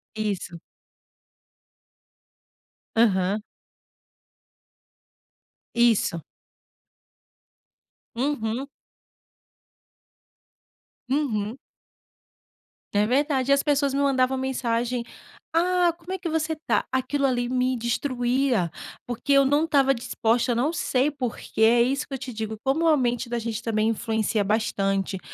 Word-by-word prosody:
Isso. 200 -5 -3 2.4
Aham. 205 -2 +2 2.3
Isso. 230 -8 +2 1.9
Uhum. 255 0 -2 2.4
Uhum. 240 -5 -1 1.4
É 205 +1 +3
verdade, 270 +2 +1
e - - +8
as 280 - +3
pessoas 285 -2 +1
me 280 - +1
mandavam 265 -2 +2
mensagem: 245 -2 -1 0.5
"Ah, 355 0 +3
como 345 +2 -10
é - - -2
que 355 -2 -5
você 320 0 -1
tá?", 310 - 0
aquilo 275 +2 0
ali 245 -1 0
me 255 0 0
destruía, 245 - 0 0.3
porque 245 +4 -3
eu 275 0 +6
não 290 +4 +3
estava 275 -4 +3
disposta, 240 -1 0
eu - - -2
não 275 +8 +1
sei 275 -3 +1
porque, 250 -5 -4
é 235 +2 +6
isso 275 +3 -1
que 275 - -5
eu - - -3
te 255 -1 -7
digo, 220 0 -4
como 295 +5 +1
a 310 -2 +5
mente 245 -2 -1
da 240 - -1
gente 230 -1 -3
também 220 -1 0
influencia 220 -1 0
bastante, 195 -2 0
250 Hz, 110 wpm, -25 LUFS, 225-280 Hz, 2.4 s, e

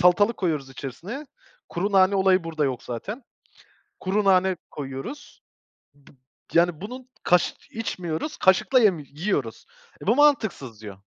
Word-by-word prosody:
salatalık 205 +6 +4
koyuyoruz 155 -7 -1
içerisine. 170 - -7 0.4
Kuru 195 +4 -2
nane 190 0 +5
olayı 190 -2 +3
burada 160 -2 -1
yok 130 -3 -2
zaten. 205 - -6 0.8
Kuru 200 +3 0
nane 190 -1 +4 0.2
koyuyoruz. 145 - -7 0.5
B 140 -1 -21 0.4
yani, 170 -2 +3
bunun 250 +6 -8
kaş 175 0 +3 0.2
içmiyoruz, 185 - -4
kaşıkla 190 +7 +4
yemi 190 -9 +3
yiyoruz. 145 - -3 0.4
"E, - - -8
bu 225 +5 +4
mantıksız" 215 - +2
diyor. 100 -3 -9
185 Hz, 130 wpm, -25 LUFS, 150-210 Hz, 0.8 s, nane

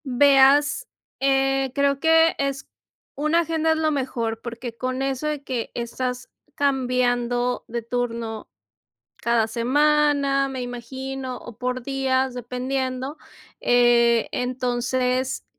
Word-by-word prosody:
Veas, 280 - +4 0.3
eh, 270 0 +2
creo 280 -1 +2
que 325 +1 +4
es 275 -1 -2 0.5
Una 305 +4 +2
agenda 320 -1 0
es 320 - +2
lo 315 -1 +1
mejor, 235 -5 -2
porque 235 0 -7
con 255 +1 -3
eso 270 +2 -2
de 300 -2 -3
que 250 -4 -3
estás 250 +1 -4 0.3
cambiando 250 -2 0
de 235 +1 -3
turno 230 -2 -3 0.7
cada 235 -1 +1
semana, 280 +3 +2
me 260 -1 -5
imagino, 260 +2 -6
o 235 - -11
por 250 0 -3
días, 265 -1 0
dependiendo, 255 +3 -3 0.4
eh, 235 -1 +4
entonces 250 +1 -1
260 Hz, 110 wpm, -23 LUFS, 245-275 Hz, 0.7 s, Veas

